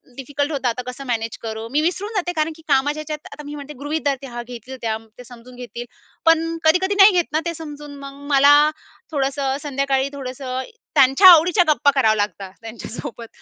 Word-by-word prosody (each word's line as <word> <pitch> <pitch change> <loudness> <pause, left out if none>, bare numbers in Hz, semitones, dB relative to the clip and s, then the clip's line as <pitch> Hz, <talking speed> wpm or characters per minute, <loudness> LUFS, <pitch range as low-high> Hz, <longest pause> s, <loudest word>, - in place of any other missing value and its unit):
Difficult 285 +3 -3
होतं 275 -4 -1
आता 250 +2 -3
कसं 260 +2 -7
मॅनेज 225 -2 -2
करू. 220 0 -5
मी 300 +2 +2
विसरून 385 +6 -2
जाते 355 -3 0
कारण 310 +1 0
की 320 - -16
कामाच्या 290 +2 +1
ह्याच्यात 305 -1 -6
आता 295 - -10
मी 295 - -7
म्हणते 295 0 -8
गृहीत 310 +2 -2
धरते 280 -1 +1
त्या 255 - -10
हा 240 - -5
घेतील 250 +2 -9
त्या 220 -1 -1 0.2
ते 250 - -10
समजून 245 +1 -14
घेतील. 245 -1 -8 0.4
पण 330 0 +3
कधी-कधी 370 +5 +3
नाही 395 +1 +8
घेत 350 -2 +2
ना 310 - +3
ते 340 - -2
समजून. 295 -3 -9
मग 275 0 -10
मला 280 +1 +7 0.6
थोडंसं 275 -1 -1
संध्याकाळी 275 -1 0
थोडंसं 260 -1 -5 0.3
त्यांच्या 270 +7 +6
आवडीच्या 355 +2 +6
गप्पा 295 -2 +4
करावा 220 -5 +4
लागतात 200 -2 -3
त्यांच्यासोबत. 230 +1 -8
275 Hz, 190 wpm, -21 LUFS, 250-310 Hz, 0.6 s, नाही